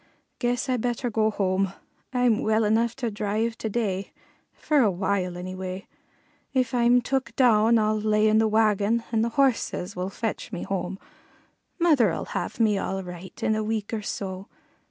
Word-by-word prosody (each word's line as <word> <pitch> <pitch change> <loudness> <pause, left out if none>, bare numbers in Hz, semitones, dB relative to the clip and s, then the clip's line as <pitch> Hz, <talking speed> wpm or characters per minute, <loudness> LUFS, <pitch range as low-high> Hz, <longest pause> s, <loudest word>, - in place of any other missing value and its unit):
Guess 245 +1 0
I 255 -1 +1
better 240 +1 -2
go 220 0 +2
home. 195 -2 0 0.4
I'm 245 -4 +2
well 220 +1 +2
enough 225 +2 +2
to 240 -4 -3
drive 215 +2 -1
to 220 - -2
day, 200 -4 -2 0.4
for 300 -2 +1
a 230 -6 +5
while 185 -1 -1
anyway; 185 +1 -6 0.7
if 255 -2 +1
I'm 245 0 +4
took 260 -2 -2
down 230 -2 +5
I'll 215 0 +1
lay 215 0 +3
in 215 0 +4
the 220 - +3
wagon, 215 +1 +2
and 225 -1 +2
the 235 - 0
horses 240 -7 +1
will 180 +1 -3
fetch 225 +3 -4
me 180 - -4
home. 190 -1 -3 0.8
Mother'll 295 - +3
have - - -3
me 215 -3 +3
all 190 0 -3
right 180 +1 -9
in 220 - +2
a 215 - -1
week 215 0 -3
or 220 - -1
so. 190 -1 -5
215 Hz, 170 wpm, -25 LUFS, 195-235 Hz, 0.8 s, a